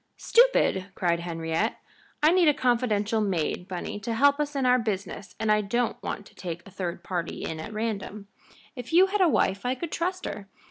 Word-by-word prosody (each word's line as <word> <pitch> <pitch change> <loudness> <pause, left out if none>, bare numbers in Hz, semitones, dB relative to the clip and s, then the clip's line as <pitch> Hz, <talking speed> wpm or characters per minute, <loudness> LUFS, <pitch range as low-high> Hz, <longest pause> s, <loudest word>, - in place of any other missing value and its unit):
"Stupid!" 465 - +3
cried 170 -2 +1
Henriette. 165 +4 -2 0.5
"I 310 - +7
need 360 -2 +4
a 295 - +5
confidential 230 -4 +1
maid, 180 -3 -1
Bunny, 185 +2 -5
to 230 +2 -3
help 285 +4 +4
us 295 -1 -2
in 270 -2 0
our 250 0 +5
business, 200 -3 -4
and 220 -1 +1
I 210 0 +4
don't 235 +3 -1
want 205 - -5
to - - -17
take 170 -2 -6
a - - -13
third 180 -2 -5
party 175 -3 -4
in 160 -1 -4
at 160 - -7
random. 215 -2 -4 0.5
If 250 +3 -8
you 360 +3 +7
had 395 +1 -1
a 360 - +5
wife 195 -8 +1
I 250 +1 0
could 320 +4 -6
trust 365 +2 -2
her. 200 -1 -6
215 Hz, 200 wpm, -27 LUFS, 190-265 Hz, 0.5 s, I